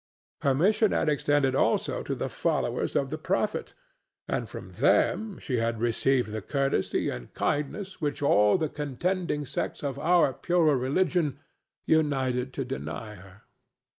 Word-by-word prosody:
Her 140 Hz, -2 st, +2 dB
mission 210 Hz, +8 st, +3 dB
had 155 Hz, -, +1 dB
extended 145 Hz, -2 st, +2 dB
also -, -, +1 dB
to -, -, -3 dB
the -, -, -3 dB
followers -, -, -1 dB
of 135 Hz, -1 st, 0 dB
the 155 Hz, -, -3 dB
Prophet, 195 Hz, +6 st, -1 dB, 0.5 s
and -, -, -2 dB
from -, -, -8 dB
them 215 Hz, -3 st, +2 dB
she 125 Hz, -, -2 dB
had 115 Hz, 0 st, -1 dB
received 120 Hz, +1 st, +1 dB
the 110 Hz, 0 st, -4 dB
courtesy 135 Hz, -2 st, 0 dB
and -, -, -8 dB
kindness 185 Hz, +7 st, -2 dB
which 145 Hz, -1 st, -2 dB
all 105 Hz, -, +5 dB
the 160 Hz, -3 st, 0 dB
contending 150 Hz, +2 st, -2 dB
sects 130 Hz, -, -4 dB
of 140 Hz, -1 st, -3 dB
our 165 Hz, -2 st, +3 dB
purer 165 Hz, 0 st, +2 dB
religion 145 Hz, +2 st, +1 dB, 0.5 s
united 130 Hz, -5 st, +1 dB
to 135 Hz, -, -3 dB
deny 115 Hz, -4 st, -5 dB
her. 95 Hz, 0 st, -15 dB
140 Hz, 145 wpm, -27 LUFS, 125-160 Hz, 0.5 s, all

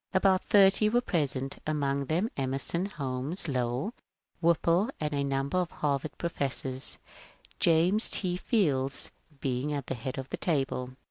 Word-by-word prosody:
About 190 Hz, 0 st, +3 dB
thirty 200 Hz, +1 st, +5 dB
were 240 Hz, +3 st, +3 dB
pre 170 Hz, -11 st, 0 dB
sent, 135 Hz, 0 st, -4 dB
among 140 Hz, -2 st, -1 dB
them 175 Hz, -, -1 dB
Emerson, 135 Hz, +7 st, -1 dB
Holmes, 140 Hz, 0 st, -3 dB
Lowell, 125 Hz, -, -2 dB, 0.5 s
Whipple, 170 Hz, +5 st, +2 dB
and 150 Hz, -1 st, -2 dB
a 140 Hz, -1 st, 0 dB
number 140 Hz, +4 st, -1 dB
of 180 Hz, -2 st, -1 dB
Harvard 145 Hz, -1 st, -2 dB
professors, 135 Hz, -5 st, +2 dB, 0.6 s
James 175 Hz, +6 st, +4 dB
T. 180 Hz, -3 st, +2 dB
Fields 145 Hz, -, 0 dB, 0.3 s
being 130 Hz, +2 st, -2 dB
at 140 Hz, -3 st, -3 dB
the -, -, -3 dB
head 130 Hz, +3 st, -6 dB
of 135 Hz, 0 st, -6 dB
the -, -, -4 dB
table. 135 Hz, -6 st, -1 dB
145 Hz, 145 wpm, -29 LUFS, 135-180 Hz, 0.6 s, thirty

